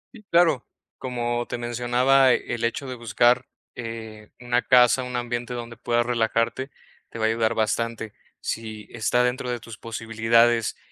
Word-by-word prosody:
Sí, 225 - -12
claro, 170 -7 +4 0.4
como 120 -2 -2
te - - -3
mencionaba, 120 +2 +3
el 120 -1 -3
hecho 125 +4 -2
de 130 - -4
buscar, 120 +1 +2 0.3
eh, 110 -3 -8
una 120 0 0
casa, 125 0 +5
un 125 0 -5
ambiente 120 0 -3
donde 120 0 -7
puedas 120 +1 0
relajarte, 115 +2 0 0.4
te - - -9
va 110 - 0
a - - +3
ayudar 115 0 +1
bastante, 115 0 -1 0.3
si 110 -2 -5
está 120 +1 +1
dentro 125 0 -1
de 120 - -2
tus 115 -1 -11
posibilidades 115 0 +1
120 Hz, 155 wpm, -24 LUFS, 115-125 Hz, 0.4 s, casa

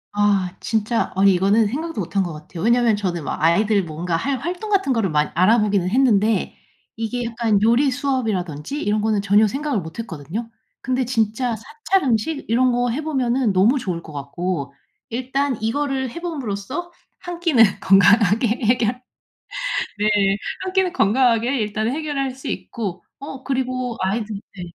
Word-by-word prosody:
아. 200 -3 +1
진짜 220 +1 0
아니 195 +1 +5
이거는 200 +4 +3
생각도 310 +4 -4
못 180 +1 -5
한 195 - +3
것 175 - -4
같아요. 160 +2 -8
왜냐면 235 -1 +3
저는 180 -5 -3
막 - - -4
아이들 200 +5 +3
뭔가 165 +1 -3
할 270 +10 -1
활동 360 - -5
같은 390 -10 +2
거를 225 -5 0
많 150 -1 +1
알아보기는 200 0 +3
했는데 220 -3 +2 0.4
이게 230 +2 -3
약간 225 -3 +1
요리 235 +6 +4
수업이라든지 240 - -2
이런 210 -3 0
거는 215 -1 +1
전혀 205 +2 +4
생각을 275 +1 -2
못 160 0 -10
했거든요. 200 - -5 0.3
근데 255 0 -1
진짜 230 0 0
사찰 300 - -1
음식 250 +6 0
이런 250 +3 +3
거 245 0 +1
해 270 +6 -2
보면은 260 -5 +1
너무 215 +9 +4
좋을 175 -7 -4
것 155 - -11
같고 140 +1 -4 0.4
일단 260 +2 -1
이거를 265 +2 -1
해 340 - -8
봄으로써 290 - -4 0.3
1 350 -1 -7
끼는 315 -10 +5 0.2
건강하게 205 +3 +5 0.2
해결 240 +1 +1 1.0
네. 210 - +1 0.6
1 375 -1 -4
끼는 380 -2 +2
건강하게 240 - +2
일단 215 +1 -1
해결할 280 -1 -2
수 260 +1 -10
있고 200 -6 -5 0.2
어 270 -1 -8
그리고 255 -2 -2
아이들 205 +2 -2 0.2
네. 180 - -7
225 Hz, 320 characters per minute, -21 LUFS, 200-265 Hz, 1.0 s, 아니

